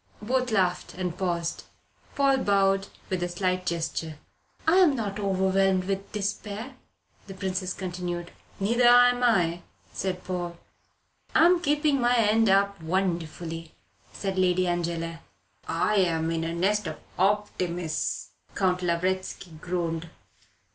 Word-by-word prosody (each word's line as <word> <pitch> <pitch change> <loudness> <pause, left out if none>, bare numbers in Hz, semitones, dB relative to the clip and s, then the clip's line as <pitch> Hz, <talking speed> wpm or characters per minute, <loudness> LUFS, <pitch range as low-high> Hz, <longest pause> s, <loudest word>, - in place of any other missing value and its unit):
Both 250 +4 0
laughed, 185 -5 0
and 180 -2 -3
paused. 175 -3 -2 0.5
Paul 275 -1 +3
bowed 195 -2 +2 0.2
with 185 -1 0
a 175 - -1
slight 185 0 -1
gesture. 165 -2 -2 0.5
"I 325 +3 +4
am 350 -7 +5
not 210 -4 -3
overwhelmed 190 -1 +2
with 195 +1 -3
despair," 210 +4 -4 0.5
the 195 - -8
Princess 185 -1 -2
continued. 175 -2 -4 0.3
"Neither 235 +5 +3
am 245 0 +6
I," 175 -8 +2 0.3
said 185 -1 -3
Paul. 175 -2 -4 0.8
"I 320 - +7
am 350 0 +5
keeping 295 -3 +2
my 240 0 +3
end 225 -1 +4
up 200 -1 +2
wonderfully," 165 -2 -3 0.4
said 195 -1 -3
Lady 185 0 +3
Angela. 170 -1 -2 0.5
"I 190 +6 +1
am 165 -3 +2
in 165 -1 -1
a 165 +1 -3
nest 200 +3 +1
of 155 - -5 0.2
optimists," 180 - -1 0.2
Count 185 -2 +1
Lavretsky 185 +1 -1
groaned. 170 -2 -2
185 Hz, 125 wpm, -27 LUFS, 175-210 Hz, 0.8 s, I